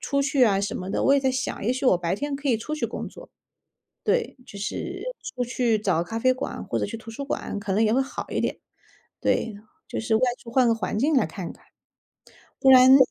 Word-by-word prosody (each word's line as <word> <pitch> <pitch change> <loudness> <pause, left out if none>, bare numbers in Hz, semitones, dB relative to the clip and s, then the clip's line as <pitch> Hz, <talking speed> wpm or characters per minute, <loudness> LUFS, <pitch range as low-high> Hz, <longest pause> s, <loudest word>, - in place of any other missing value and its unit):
出 280 0 0
去 275 -1 +2
啊 200 -4 +3
什 200 - -2
么 185 - -5
的， - - 0
我 275 - +5
也 280 - +3
在 265 -1 +2
想， 260 -5 -3
也 225 - +2
许 260 +1 -4
我 180 - +5
白 175 0 -1
天 290 +4 -3
可 280 0 -3
以 235 - +4
出 300 +8 -4
去 305 - -1
工 - - -5
作。 - - -12 0.7
对， 475 -10 +1
就 - - -11
是 350 - -4 0.3
出 250 - -1
去 240 -2 +1
找 185 -6 +1
咖 200 +6 -6
啡 255 +3 +3
馆 255 - -5
或 - - -2
者 - - -1
去 225 - -5
图 225 0 -10
书 280 +5 -6
馆 275 - -3
可 200 -1 -3
能 210 - +3
也 215 - +3
会 255 - +3
好 270 - -4
一 - - -1
点。 - - -1 0.6
对， 225 - +1 0.4
就 - - -4
是 220 0 0
外 220 - +2 0.2
出 235 - -15
换 255 -1 +4
个 230 - +4
环 220 - -3
境 290 +7 +2
来 265 - +4
看 185 -5 -6
看。 - - -21 1.0
不 270 - +6
然 260 +1 +9
250 Hz, 260 characters per minute, -25 LUFS, 215-275 Hz, 1.0 s, 然